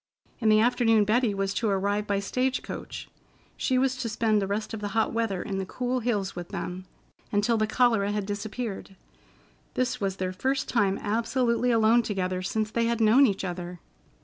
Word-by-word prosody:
In 225 -3 +2
the 215 0 +6
afternoon 225 -2 +4
Betty 220 0 +2
was 195 0 -1
to 225 0 0
arrive 200 +1 0
by 200 -1 +1
stage 255 +6 -1
coach. - - -7 0.5
She 255 - 0
was 265 0 +2
to 250 -3 -3
spend 215 -1 +1
the 195 - -1
rest 215 +3 -3
of 220 - -4
the 205 - -3
hot 220 - +2
weather 225 -5 -1
in 195 -3 -3
the 190 - -2
cool 250 +3 -2
hills 210 -5 -1
with 175 -1 -6
them, 185 +1 -5 0.5
until 210 +3 +2
the 215 -1 +1
cholera 220 -3 +2
had 205 -1 -2
disappeared. 205 0 -5 0.8
This 255 -3 -1
was 195 -1 -1
their 185 -1 -3
first 265 +7 -1
time 200 -5 +1
absolutely 235 +3 0
alone 230 0 +4
together 185 -4 -2
since 215 +3 -2
they 230 0 +1
had 235 0 0
known 230 +5 +6
each 195 -3 -2
other. 175 -1 -5
215 Hz, 190 wpm, -27 LUFS, 195-235 Hz, 0.8 s, the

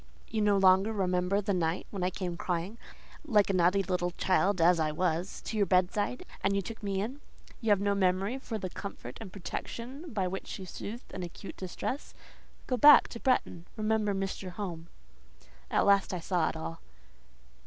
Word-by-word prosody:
You 220 - -1
no 205 -1 +4
longer 190 +2 +5
remember 185 -1 +1
the 200 0 0
night 170 -1 0
when 195 - -4
I 180 - +2
came 180 -2 -4
crying, 180 +5 -3 0.4
like 210 -9 +3
a - - -2
naughty 185 +2 +3
little 180 -1 0
child 185 +2 +1
as 170 +1 +5
I 155 -1 +1
was, 175 +3 -1
to 220 - -4
your 200 -2 +3
bedside, 195 +6 +1 0.2
and 195 0 +2
you 200 - +1
took 225 +5 -8
me 195 -2 -1
in. 255 +8 -5 0.4
You 225 - -1
have 205 -2 +5
no 200 0 +1
memory 195 +5 +1
for 230 -4 -4
the 185 -3 -5
comfort 130 -10 -7
and 205 -5 -8
protection 250 - -6
by 195 -5 0
which 190 +1 -5
you 190 - -7
soothed 220 +5 -8
an 190 - -5
acute 175 +3 -8
distress? 195 +9 -5 0.5
Go 255 - 0
back 295 +5 +8
to 235 - -7
Bretton. 205 -10 0
Remember 215 -1 +1
Mr. 195 -1 -3
Home." 175 -3 -6 0.8
At - - +2
last 200 -2 +4
I - - -3
saw 170 0 +1
it - - -6
all. 80 +1 -6
195 Hz, 185 wpm, -30 LUFS, 180-210 Hz, 0.8 s, back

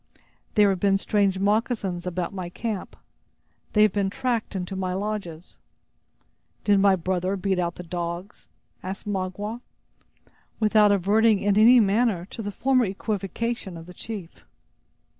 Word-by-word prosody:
"There 205 -2 +5
have 190 - -2
been 195 0 +3
strange 200 -1 +1
moccasins 200 -3 0
about 180 +2 -3
my 185 -3 -5
camp. 215 +1 -5 0.8
They 210 - +5
have 215 - +4
been 200 -2 0
tracked 230 0 -2
into 185 0 -4
my 185 -1 -2
lodges." 195 -5 -5 1.0
"Did 205 -1 +4
my 195 -1 +5
brother 185 +2 -1
beat 190 -1 0
out 170 -1 -1
the 180 - -8
dogs?" 175 +2 -6 0.3
asked 190 +1 -6
Magua, 205 +3 -3 1.0
without 215 -1 +4
adverting 210 +3 +3
in 200 +1 +1
any 235 +4 +7
manner 205 -3 +2
to 230 - -6
the 205 -1 -4
former 255 +3 +2
equivocation 200 0 -3
of 165 - -10
the 180 - -12
chief. 200 -4 -8
200 Hz, 140 wpm, -25 LUFS, 185-215 Hz, 1.0 s, any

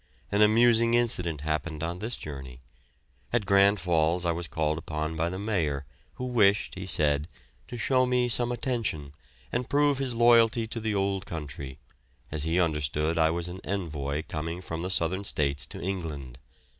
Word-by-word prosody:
An 100 - +2
amusing 115 +2 +5
incident 90 -11 +1
happened 75 0 -2
on 85 +2 -3
this 115 +4 -4
journey. 65 -4 -8 0.7
At 120 -4 +1
Grand 100 +1 +5
Falls 85 0 +1
I 85 - +2
was 85 0 -4
called 80 0 -1
upon 80 0 -4
by 85 +1 0
the 90 - -4
Mayor, 85 -9 -1 0.3
who 125 - -4
wished, 105 -5 +3
he 95 0 -6
said, 75 -2 +2 0.4
to 120 - -7
show 130 +2 +2
me 125 -1 +2
some 120 0 +2
attention 115 - -2 0.4
and 125 - -2
prove 145 -1 +3
his 130 -3 -2
loyalty 115 0 +5
to 115 +1 -4
the 110 -1 -1
old 95 -1 -1
country, 70 -4 -6 0.5
as 75 0 -1
he 85 +2 +1
understood 75 -1 0
I 80 0 +4
was 85 +1 -1
an 90 +2 -7
envoy 75 -6 -3
going 80 +3 -4
from 80 -1 -4
the 90 - -3
Southern 95 +2 0
States 70 -7 -1
to - - -8
England. 80 -9 -5
90 Hz, 170 wpm, -28 LUFS, 75-110 Hz, 0.7 s, amusing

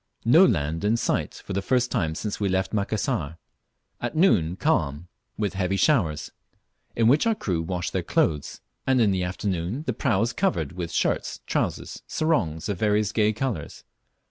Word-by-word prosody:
No 155 +11 +7
land 80 -3 -1
in 110 +3 +2
sight - - -1
for - - -5
the 100 - 0
first 125 +4 +1
time 80 -9 0
since 105 +4 -4
we 100 -2 0
left 95 +2 0
Macassar. 105 - -1 0.6
At - - -3
noon 90 - +3
calm, 85 - 0 0.3
with 105 -3 -1
heavy 95 0 0
showers, 95 - +1 0.6
in 115 -1 +3
which 145 - +4
our 225 - +3
crew 90 - -2
wash 85 +1 -3
their - - -1
clothes, 75 -3 0 0.3
anti 130 -2 +4
in 105 - +3
the 95 -1 0
afternoon 95 - -2
the - - -1
prau 115 -7 +1
is 120 0 -1
covered 190 - 0
with 90 -2 -5
shirts, - - -1
trousers, - - -2
and - - -20
sarongs 90 - 0
of 100 -4 -3
various 105 -1 +2
gay 105 -1 +2
colours. 110 - -4
100 Hz, 175 wpm, -25 LUFS, 85-120 Hz, 0.6 s, No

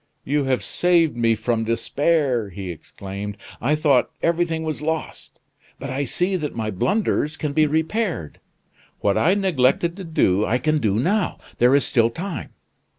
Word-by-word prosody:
"You 145 +1 +1
have 130 -6 0
saved 170 - +2
me 115 -1 +2
from 115 +1 -1
despair," 130 0 0
he 95 0 -6
exclaimed, 100 +5 -7 0.2
"I 145 +5 +2
thought 150 -4 +3
everything 165 -1 +1
was 155 -2 -4
lost; 160 +1 -4 0.4
but 135 0 -6
I 140 +2 -1
see 180 +9 0
that 150 -4 -4
my 110 -2 -2
blunders 160 - 0
can 150 -2 -3
be 155 +1 +4
repaired. 160 - -1 0.6
What 100 -1 +2
I 165 - +3
neglected 170 -3 +2
to 195 - -6
do, 105 - +2
I 115 +3 +1
can 155 +4 +1
do 105 -5 +1
now; 185 - 0 0.2
there 125 +3 +5
is 140 -3 +3
still 115 -1 +3
time. 175 +8 -5
140 Hz, 160 wpm, -22 LUFS, 115-165 Hz, 0.6 s, there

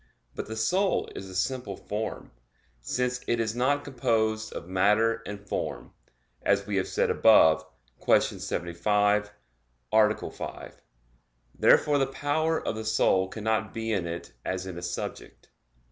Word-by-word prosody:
But - - -5
the 110 - -5
soul 185 - +1
is 95 - -7
a 95 - -9
simple 105 +1 -2
form; 110 +2 -5 0.5
since 125 - -1
it 120 - +1
is 110 0 -1
not 140 +4 +1
composed 110 -4 0
of 85 - -7
matter 105 +5 +2
and 100 0 -8
form, - - -4 0.5
as 100 0 +2
we 100 -1 -2
have 95 - 0
said - - +1
above 80 -8 +6 0.4
(Q. - - +6
75, 105 +5 0 0.6
A. 110 -1 +3
5). - - -8 0.7
Therefore 145 -1 +4
the 135 - +2
power 155 +4 -1
of - - 0
the 110 - -5
soul 110 -3 +2
cannot 110 +2 -2
be 115 0 -2
in 95 -5 0
it 85 -6 -6
as 95 0 -3
in 95 -2 -6
a 85 - -6
subject. 90 - -6
110 Hz, 145 wpm, -27 LUFS, 95-115 Hz, 0.7 s, above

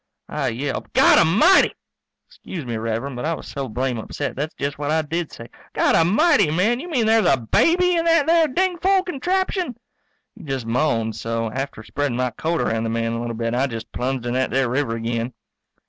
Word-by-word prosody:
I - - -2
yelped, 135 +4 -4
"Godamighty!" 205 - +5 0.5
'Scuse 170 -7 -8
me, 120 -1 -4
Rev'rend, 115 +4 -3
but 120 - -5
I 165 +2 0
was - - -10
so 135 -2 -5
blame 125 +1 -2
upset - - -5
that's 150 +4 -4
just 140 0 -4
what 145 -1 -2
I 160 +1 +1
did 165 +2 -3
say, 115 - -10 0.3
"Godamighty, 205 - +4
man, 210 +9 +1
you 350 +6 -7
mean 250 -9 +1
there's 220 0 +4
a - - +4
baby 345 - +2
in 330 - 0
that 330 -3 +4
there 330 0 +4
dingfol 370 +4 +1
contraption?" 360 - -1 0.6
He 220 -5 -14
just 135 -5 -4
moaned 115 -3 0
so 115 0 -3
after 130 -3 -5
spreadin' 145 +1 -2
my 125 -1 0
coat 165 +5 -2
around 110 0 0
the - - -1
man 115 0 -1
a 115 - -3
little 120 -1 -4
bit 115 +1 -2
I 130 +3 +1
just 115 -3 -7
plunged 130 0 -3
in 120 - -2
that 130 +1 0
there 135 -1 +1
river 125 -2 -1
again. 115 +1 -3
140 Hz, 195 wpm, -22 LUFS, -, 0.6 s, Godamighty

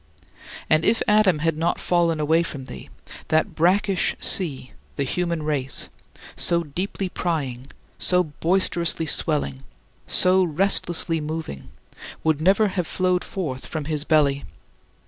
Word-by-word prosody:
And 155 +1 +3
if 225 +5 +2
Adam 210 -5 +4
had 165 -1 +1
not 170 +1 0
fallen 170 -2 +1
away 160 +2 +2
from 145 -5 -6
thee, 65 - -10 0.4
that 160 0 +1
brackish 190 +3 +1
sea 140 -8 -1 0.2
the 140 - -1
human 170 +3 -2
race 140 -3 -3 0.5
so 170 0 +1
deeply 185 +5 -4
prying, 140 -9 -3 0.3
so 180 0 +2
boisterously 170 +1 0
swelling, 150 -4 -1 0.5
so 185 +1 +5
restlessly 170 -1 +2
moving, 155 - -6 0.5
would 155 -2 +1
never 200 +5 +3
have 180 -3 -3
flowed 185 -1 0
forth 150 -9 -5
from 155 -3 -5
his 150 -1 -2
belly. 145 -3 +2
165 Hz, 125 wpm, -23 LUFS, 150-180 Hz, 0.5 s, so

